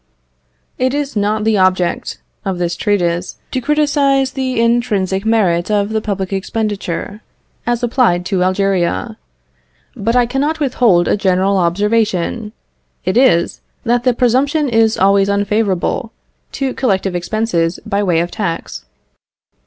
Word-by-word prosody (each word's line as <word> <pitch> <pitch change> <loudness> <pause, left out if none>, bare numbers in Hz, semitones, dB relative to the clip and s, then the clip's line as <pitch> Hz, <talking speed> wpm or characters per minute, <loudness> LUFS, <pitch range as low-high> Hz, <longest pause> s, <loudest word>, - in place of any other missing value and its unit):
It 255 +2 +1
is 290 -3 -3
not 210 +1 0
the 220 -2 +2
object 185 -2 0 0.2
of 190 -2 -2
this 175 -1 -1
treatise 180 -3 -1
to 260 - -1
criticise 280 -2 +2
the 260 -3 -2
intrinsic 220 -4 +1
merit 185 -6 +2
of 205 -1 +1
the 220 0 -1
public 195 -3 -3
expenditure 205 0 -3 0.5
as 240 0 0
applied 230 -8 +2
to 190 -1 0
Algeria, 195 +3 0 0.8
but 230 +1 -1
I 245 -1 +4
cannot 285 +6 -1
withhold 245 - +2
a - - +2
general 195 0 +1
observation. 210 +3 0 0.5
It 185 - 0
is, 240 -9 +3 0.2
that 240 0 +1
the 250 -2 +2
presumption 270 +5 +1
is 225 -1 +2
always 195 +1 +3
unfavourable 205 +2 0 0.4
to 270 -2 -2
collective 195 -7 0
expenses 175 -2 -1
by 200 +1 0
way 175 -5 +2
of 175 - -3
tax. 165 - -4
210 Hz, 130 wpm, -16 LUFS, 185-240 Hz, 0.8 s, I